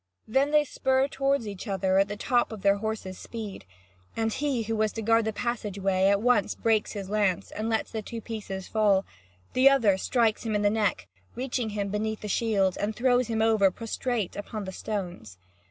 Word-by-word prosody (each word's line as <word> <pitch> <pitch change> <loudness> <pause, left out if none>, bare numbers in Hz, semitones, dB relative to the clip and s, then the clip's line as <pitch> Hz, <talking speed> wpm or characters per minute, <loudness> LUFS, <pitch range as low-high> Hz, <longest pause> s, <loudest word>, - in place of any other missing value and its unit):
Then 270 +6 +2
they 300 0 +4
spur 265 0 +1
toward 275 -3 0
each 205 +1 -7
other 190 -1 +1
at 195 - +3
the 205 0 -5
top 245 +2 +1
of 215 -3 -8
their 200 0 +4
horses' 210 -3 -4
speed. 215 - -7 0.5
And 225 -1 0
he 275 -5 -1
who 225 +1 -2
was 215 -1 +1
to 225 - -4
guard 225 +1 +3
the 220 - 0
passage 220 -3 -3
way 190 0 +2
at 200 +1 +2
once 245 -5 +3
breaks 220 -2 +1
his 200 -2 -5
lance 200 -3 0
and 220 +2 -3
lets 220 -1 -1
the 220 - -3
two 230 +2 -6
pieces 205 -4 -6
fall; 205 -3 +2 0.5
the 260 +2 +7
other 220 -9 +3
strikes 230 0 +1
him 220 -2 -2
in 210 - +1
the 205 - +4
neck, 210 - 0 0.3
reaching 245 -2 -2
him 200 -1 -1
beneath 215 +2 -2
the 210 - -5
shield, 200 -4 +1
and 210 +1 -1
throws 250 -1 +2
him 220 -1 0
over 220 -3 +4
prostrate 225 0 -3
upon 205 0 -5
the 190 - -5
stones. 180 - -5
215 Hz, 205 wpm, -27 LUFS, 200-230 Hz, 0.5 s, the